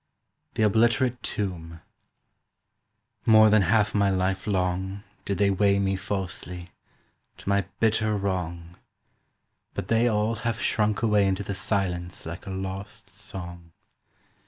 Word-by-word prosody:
THE 110 - +1
OBLITERATE 120 +4 +3
TOMB 85 -6 -4 1.5
"MORE 110 -1 +7
than 110 -1 +6
half 105 +3 +2
my 100 -1 +3
life 95 0 0
long 95 0 -1 0.2
Did 100 - -1
they 100 +1 +3
weigh 100 +1 +3
me 95 -1 +1
falsely, 90 -2 -5 0.7
to - - -15
my 100 -1 +2
bitter 110 -1 +2
wrong, 90 -3 -3 1.0
But 95 - -4
they 115 +1 +3
all 110 0 +1
have 115 +1 -2
shrunk 105 0 +1
away 105 -3 +4
into 95 +1 0
the 100 - -4
silence 90 -3 -2
Like 85 +4 -7
a - - -4
lost 95 +2 -6
song. 85 -5 -8
100 Hz, 130 wpm, -26 LUFS, 95-105 Hz, 1.5 s, MORE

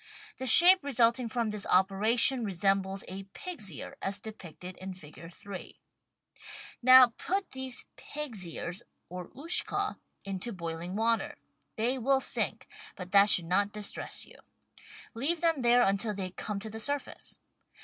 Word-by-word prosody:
The 260 - -5
shape 355 +7 +9
resulting 235 -3 +2
from 230 -1 -2
this 210 -1 -4
operation 220 +7 +3
resembles 195 0 -1
a 190 +1 -8
pig's 305 - -6
ear, 145 - -9
as 195 +1 -3
depicted 185 -4 -10
in 190 0 -8
Figure 165 0 -13
3. 190 +2 -10 1.0
Now 255 -1 +7
put 390 +1 -3
these 260 -1 -2
pig's 280 -10 -4
ears 170 +2 -6 0.3
or 180 0 -8
Ushka 365 +7 -1 0.3
into 195 +4 -5
boiling 170 0 -6
water; 230 +1 -1 0.4
they 245 +4 -1
will 265 +3 +2
sink, - - -2 0.3
but 180 -1 -10
that 200 +1 +5
should 175 - +4
not 200 +4 0
distress 210 -1 -4
you. - - -17 0.8
Leave 290 +8 -1
them 330 -5 +1
there 245 0 +4
until 200 +1 -1
they 185 -2 -5
come 205 +2 -5
to 220 - -7
the 220 - -8
surface. 285 +4 -5
215 Hz, 145 wpm, -29 LUFS, 190-255 Hz, 1.0 s, shape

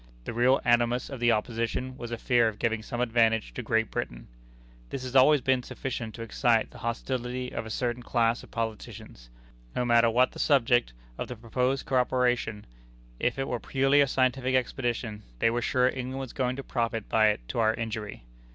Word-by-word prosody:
The - - -5
real 125 +3 +4
animus 120 +2 +2
of 135 - -6
the 120 0 +4
opposition 115 +3 -2
was 120 -3 -7
a 120 - -3
fear 120 0 +3
of 110 -1 -3
giving 115 0 0
some 120 +2 -4
advantage 115 -2 +2
to - - -4
Great 110 -1 0
Britain. - - -4 0.6
This 130 - -5
has 130 0 -6
always 135 +2 +6
been 130 0 +2
sufficient 120 -3 -5
to 115 - -6
excite 115 0 +1
the - - -13
hostility 125 +1 -3
of 110 - -4
a - - -7
certain 120 +1 -2
class 120 -1 +1
of - - -14
politicians. 110 - -6 0.5
No 125 - 0
matter 120 -1 +5
what 125 +3 +3
the - - -11
subject 120 - +3 0.3
of - - -3
the 125 - -6
proposed 125 +4 -1
coöperation, 125 -4 +1 0.6
if 120 - 0
it 135 - -2
were 120 - -2
purely 135 +3 +3
a 140 - +4
scientific 130 0 +1
expedition, 120 -4 -2 0.2
they 115 - +2
were 120 +1 -1
sure 125 +1 +2
England 130 0 -3
was 135 -2 -6
going 125 -2 -1
to 135 - -6
profit 115 -4 -2
by 110 -1 +4
it 105 - -1
to - - -2
our 110 -1 +3
injury. 110 - -5
120 Hz, 195 wpm, -28 LUFS, 115-130 Hz, 0.6 s, always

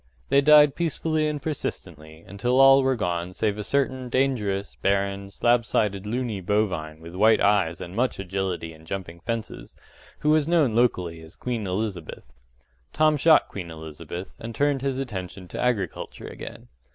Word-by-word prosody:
They 140 - +5
died 150 -1 +7
peacefully 155 -1 0
and 150 -1 -2
persistently, 80 - -6
until 120 +7 0
all 135 0 +8
were 130 0 +2
gone 90 -4 -3
save 105 -1 -1
a - - -3
certain 130 +1 -1
dangerous, 115 -7 0
barren, 100 0 -1
slab 120 +4 +2
sided 105 -2 -1
luny 115 -3 -2
bovine 90 -6 -1
with 85 +1 -10
white 110 +4 +4
eyes 100 -5 +2
and 90 +2 -8
much 125 +3 0
agility 95 -3 -3
in 80 0 -17
jumping 85 -2 -6
fences, 115 +4 -5 0.5
who 150 - +3
was 155 -1 +3
known 160 -9 +3
locally 90 -9 +1
as 80 +3 -14
Queen 120 -5 -3
Elizabeth. 95 -3 -4 0.7
Tom 155 0 +3
shot 155 +2 +5
Queen 90 -4 -7
Elizabeth, 80 +3 -8
and 115 0 -7
turned 145 0 +1
his 135 -1 -1
attention 95 -8 -6
to - - -5
agriculture 105 -9 -2
again. - - -9
105 Hz, 160 wpm, -25 LUFS, 90-130 Hz, 0.7 s, all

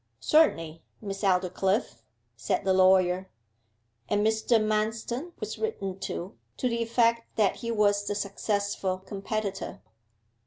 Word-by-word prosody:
'Certainly, 165 - +2 0.2
Miss 195 -2 -6
Aldclyffe,' 185 - +1 0.3
said 115 +9 -1
the 190 - +3
lawyer. 185 0 +4 0.8
And 205 +1 +2
Mr. 220 +1 +3
Manston 220 +8 -1
was - - -5
written 195 - -3
to, 185 0 -5 0.2
to 255 - 0
the 235 -1 -1
effect 230 0 +2
that 210 -3 +2
he 230 - -5
was 205 -2 +2
the 205 - -1
successful 200 -1 -1
competitor. 200 +2 -4
205 Hz, 120 wpm, -28 LUFS, 190-225 Hz, 0.8 s, lawyer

